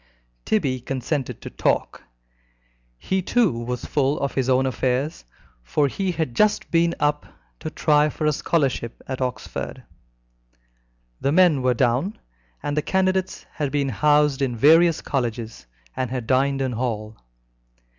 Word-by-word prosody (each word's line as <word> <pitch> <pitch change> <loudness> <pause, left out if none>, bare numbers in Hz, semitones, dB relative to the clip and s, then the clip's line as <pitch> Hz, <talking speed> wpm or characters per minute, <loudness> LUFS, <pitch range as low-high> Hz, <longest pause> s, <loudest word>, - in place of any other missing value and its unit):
Tibby 140 -12 +1
consented 135 +2 -3
to - - -7
talk. - - -1 1.0
He 190 - -1
too 230 +3 +2
was 120 +1 -4
full 145 0 0
of 140 - -2
his 130 -1 0
own 130 +1 +3
affairs, 130 - -1 0.4
for 105 - +1
he 190 +7 -2
had 160 -7 -2
just 210 -1 +2
been 170 0 +2
up 150 0 0 0.3
to - - -5
try 150 0 +3
for 155 - -4
a 150 - +3
scholarship 135 -7 -1
at 130 0 -4
Oxford. 125 -1 -4 1.4
The 140 - 0
men 170 -4 +4
were 125 -1 +2
down, 130 - +1 0.5
and 145 - -2
the 150 - +2
candidates 190 +2 0
had 145 -3 -3
been 140 -1 0
housed 150 +2 +3
in 130 -3 0
various 165 +6 +5
colleges, 120 - -3 0.3
and 130 -2 -2
had 125 -2 -4
dined 135 +2 +2
in 130 - -1
hall. 110 -3 -3
140 Hz, 145 wpm, -23 LUFS, 125-155 Hz, 1.4 s, various